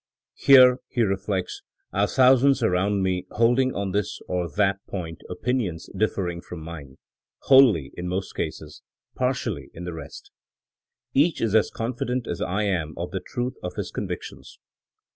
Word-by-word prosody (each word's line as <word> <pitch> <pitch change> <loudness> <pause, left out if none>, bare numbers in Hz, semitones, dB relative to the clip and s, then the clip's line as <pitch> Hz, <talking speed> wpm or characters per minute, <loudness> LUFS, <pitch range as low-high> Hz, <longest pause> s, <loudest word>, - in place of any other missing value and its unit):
* - - -69
Here, 130 -2 +8
* - - -69
he 120 - +3
re 95 -2 +1
flects, 95 -1 -4 0.2
' - - -48
are 100 +2 +2
thousands 130 +1 +4
around 100 0 +1
me 95 -1 -1
holding 120 +3 +2
on 100 -1 -2
this 100 +1 -2
or 90 -2 -2
that 100 +4 +1
point 85 -4 -6
opinions 110 -9 -2
differing 95 -4 -1
from 90 - -9
mine 80 -5 -9 0.2
— - - -70
wholly 120 - +6
in 90 - -5
most 95 +2 -3
cases; - - -5 0.3
partially - - -2
in 85 - -7
the 90 -1 -5
rest. 80 -3 -10 0.8
Each 150 +4 +3
is 110 -3 0
as 110 -1 +4
confident 120 +1 -3
as 85 - -4
I 100 +4 -1
am 85 -6 -1
of 85 +1 -4
the 95 - -2
truth 125 +5 -3
of 90 0 -5
his - - -4
convictions. - - -6
100 Hz, 170 wpm, -24 LUFS, 90-120 Hz, 0.8 s, Here